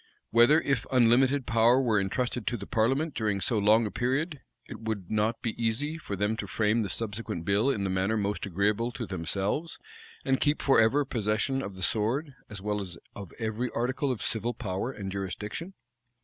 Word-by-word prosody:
Whether, 120 +7 +6
if 140 -5 -1
unlimited 130 +2 +4
power 115 +2 +4
were 115 -6 +2
intrusted 120 +4 -2
to 120 - 0
the 100 - -7
parliament 135 +7 +1
during 105 -5 -1
so 110 +3 +1
long 110 +3 +4
a 105 - -3
period, 140 +5 -1 0.2
it - - -9
would 110 -5 -4
not 110 +2 0
be 115 - 0
easy 145 +8 -1
for 100 - -5
them 105 +3 0
to 100 - -4
frame 110 +3 +1
the 100 - -2
subsequent 105 -4 -2
bill 100 +7 +2
in 105 -7 0
the 95 - -1
manner 95 +4 +1
most 105 0 -2
agreeable 105 +6 0
to 120 - -4
themselves, 100 - -2 0.5
and 135 -1 +1
keep 145 +1 +2
forever 135 +2 +4
possession 115 +3 0
of 100 -4 -6
the 95 - -5
sword, 125 - 0 0.2
as 100 -2 -7
well 105 0 -1
as 90 -4 -6 0.2
of 100 -4 -8
every 115 +2 -2
article 130 +3 0
of 120 - -3
civil 115 +2 -1
power 100 0 -3
and 100 -6 -6
jurisdiction. 105 - -5
110 Hz, 190 wpm, -28 LUFS, 100-130 Hz, 0.5 s, Whether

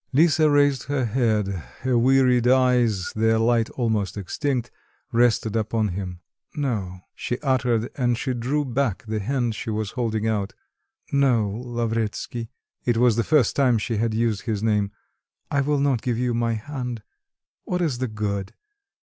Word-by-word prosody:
Lisa 155 +1 +4
raised 145 -3 +3
her 140 -2 0
head, 110 -3 +1 0.4
her 130 -1 +1
wearied 125 0 +4
eyes, 125 -6 +3
their 110 +1 +3
light 115 0 +2
almost 110 -5 -1
extinct, 120 - -2 0.4
rested 115 -2 +2
upon 110 -1 0
him.... 90 -1 -5 0.3
"No," 105 -11 -2
she 125 - -3
uttered, 125 -4 +1
and 120 -3 +1
she 130 +2 -2
drew 135 +5 -1
back 130 -5 -1
the 110 0 -2
hand 120 +2 -1
she 110 - -5
was 110 -2 -2
holding 110 -3 -1
out. 105 -1 -1 0.6
"No, 130 -7 +3
Lavretsky 115 0 -3 0.3
(it 120 -2 +1
was 120 -2 +4
the 115 - +1
first 145 -3 +3
time 130 -4 +3
she 110 +1 -2
had 110 0 0
used 115 -1 0
this 110 -2 -1
name), 105 -2 +1 0.6
I 140 - +2
will 145 +1 +1
not 140 -5 +1
give 120 -2 -1
you 125 0 0
my 115 0 0
hand. 125 -1 -5 0.6
What 180 - -1
is 140 -7 -1
the 130 - -1
good? 100 -3 -3
120 Hz, 155 wpm, -24 LUFS, 110-130 Hz, 0.6 s, Lisa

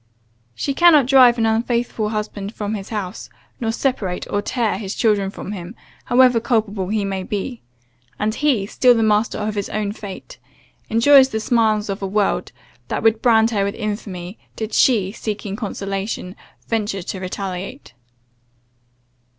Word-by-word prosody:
She 275 - -2
cannot 310 -3 +6
drive 255 -2 +6
an 225 - +1
unfaithful 230 -1 0
husband 210 -1 -4
from 210 -1 -3
his 195 -3 -5
house, 205 -3 -5 0.3
nor 225 -2 -1
separate, 225 -7 -2
or 205 - +1
tear, 220 -3 -1
his 200 -2 -5
children 205 -4 +2
from 195 - -7
him, 190 +1 -7 0.3
however 250 -1 +5
culpable 215 -5 -1
he 210 0 -1
may 195 -1 -2
be; 210 +5 -4 0.6
and 215 +1 0
he, 260 -7 +1
still 245 +4 +4
the 225 - +2
master 215 +1 +2
of 210 0 -2
his 200 -1 -3
own 210 -1 -2
fate, 205 -2 -9 0.5
enjoys 265 +4 +6
the 220 - -2
smiles 220 -2 +1
of 195 0 -4
a 195 - -2
world, 205 +1 0 0.4
that - - -3
would 225 0 +3
brand 225 -2 +4
her 205 -3 +1
with 200 +1 -2
infamy, 205 -3 -5 0.2
did 220 0 -5
she, 205 -7 +3
seeking 205 -2 -5
consolation, 195 -2 -4 0.3
venture 205 -4 -2
to 190 - -5
retaliate. 190 - -6
215 Hz, 155 wpm, -20 LUFS, 200-230 Hz, 0.6 s, cannot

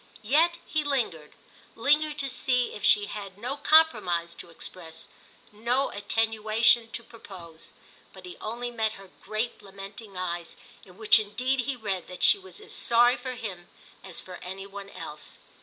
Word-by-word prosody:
Yet 320 +9 +4
he 310 -1 0
lingered—lingered 280 - 0
to 280 -2 -1
see 250 -1 +1
if 210 - -8
she 205 - +6
had 200 -2 -7
no 245 +6 -3
compromise 285 - +4
to - - -11
express, 165 -1 -9 0.4
no 240 +6 0
attenuation 225 +2 +2
to 235 - -5
propose. 180 -8 -10 0.4
But 190 -1 -13
he 180 - -8
only 240 +3 -4
met 220 -2 0
her 195 -3 -13
great 215 +3 -3
lamenting 195 0 -10
eyes, 175 -2 -4 0.3
in 185 -1 -17
which 220 0 +6
indeed 245 +6 0
he 275 - 0
read 200 -6 -3
that 180 - -6
she 410 - +8
was 380 +2 -13
as 425 - -10
sorry 240 +1 +4
for 255 0 -5
him 190 -7 -7 0.3
as 190 -3 -5
for 180 -1 -9
any 190 +2 -7
one 200 0 -9
else. - - -9
215 Hz, 155 wpm, -28 LUFS, 190-250 Hz, 0.4 s, she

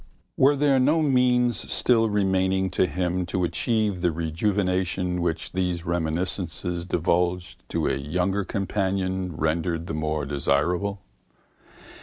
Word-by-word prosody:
Were 140 +2 +4
there 140 -1 +3
no 150 +5 +3
means 125 -3 +2
still 115 -3 +3
remaining 95 -2 +1
to 90 - +2
him 90 0 -1
to 90 +1 -1
achieve 105 0 0
the 90 -1 +2
rejuvenation 90 +2 -1
which 85 -1 -2
these 90 -2 -2
reminiscences 85 +1 -2
divulged 90 0 -1
to - - -1
a - - +1
younger 90 +8 -1
companion 95 -2 -2
rendered 80 +2 -1
the 80 - -5
more 75 -1 -2
desirable? 85 +8 0
90 Hz, 120 wpm, -25 LUFS, 85-100 Hz, -, Were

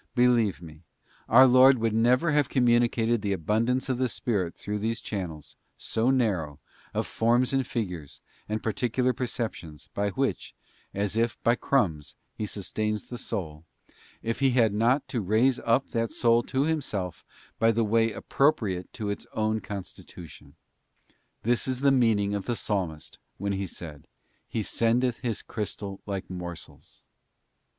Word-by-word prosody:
Believe 120 -8 +3
me, 80 -1 -12 0.5
our 130 +4 +8
Lord 130 +1 +7
would 115 -1 0
never 125 +8 +3
have 145 -2 +2
communicated 120 -2 +2
the 100 -1 0
abundance 115 +9 0
of 130 -2 -1
the 130 -1 +1
Spirit 95 -10 -2
through 105 +1 -4
these 115 +2 -1
channels, 80 -8 -6 0.2
so 115 +3 0
narrow, 95 - 0 0.3
of - - -1
forms 120 +3 +1
and 135 -2 +1
'figures 90 - -4 0.3
and 110 +1 -2
particular 125 +3 0
perceptions, 115 - -5
by 100 0 0
which, 95 - -2 0.4
as 100 +1 -2
if 115 +1 0
by 120 - +4
crumbs, 95 - 0 0.2
He 105 - -4
sustains 105 +1 -3
the 120 - -6
soul, 80 -8 -5 0.6
if 115 +1 -2
He 135 0 +4
had 120 -4 +3
not 120 +6 +2
to 120 - -1
raise 115 +6 +2
up 120 +4 +1
that 115 -1 -1
soul 115 -1 +3
to 135 +1 0
Himself 130 - -2 0.4
in 115 -1 +4
the 115 - +2
way 115 +1 +2
appropriate 110 - 0
to 105 -2 -3
its 100 - -6
own 110 0 0
constitu 95 -3 -8
tion. 70 -2 -16 0.9
This 120 +3 +1
is 130 0 -2
the 140 0 +5
meaning 110 -6 +3
of 100 -2 -3
the 120 - -1
Psalmist 90 -10 -3 0.2
when 100 +1 -2
he 95 0 -2
said: 75 -4 -10 0.2
' - - -42
He 110 - -2
sendeth 120 +3 +1
His 120 -4 -3
crystal 100 -2 -5
like 100 -2 -4
morsels. 90 -2 -9
110 Hz, 155 wpm, -27 LUFS, 100-125 Hz, 0.9 s, our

